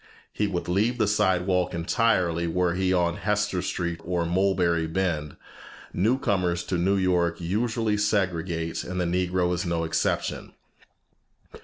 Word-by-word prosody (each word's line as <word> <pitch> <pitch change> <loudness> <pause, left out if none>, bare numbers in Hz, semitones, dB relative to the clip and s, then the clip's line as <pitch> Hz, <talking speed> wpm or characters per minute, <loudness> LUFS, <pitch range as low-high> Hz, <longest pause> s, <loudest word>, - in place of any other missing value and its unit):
He 105 - 0
would 90 -3 -3
leave 105 +7 +1
the 110 -3 +2
sidewalk 90 -3 +1
entirely 85 -2 +1
were 90 +1 +1
he 95 +1 0
on 85 -2 +1
Hester 105 -3 0
Street 85 -2 -3
or 85 -1 -1
Mulberry 90 -2 +1
Bend. 80 -4 -2 0.6
New 110 +8 +2
comers 90 -8 0
to 90 - -2
New 95 +3 +2
York 90 -3 +1
usually 110 +4 0
segregate, 90 -5 -1
and 90 +1 -4
the 90 - +1
Negro 90 0 0
is 90 - -1
no 85 -1 -1
exception. 80 - -2
90 Hz, 140 wpm, -26 LUFS, 85-100 Hz, 0.6 s, the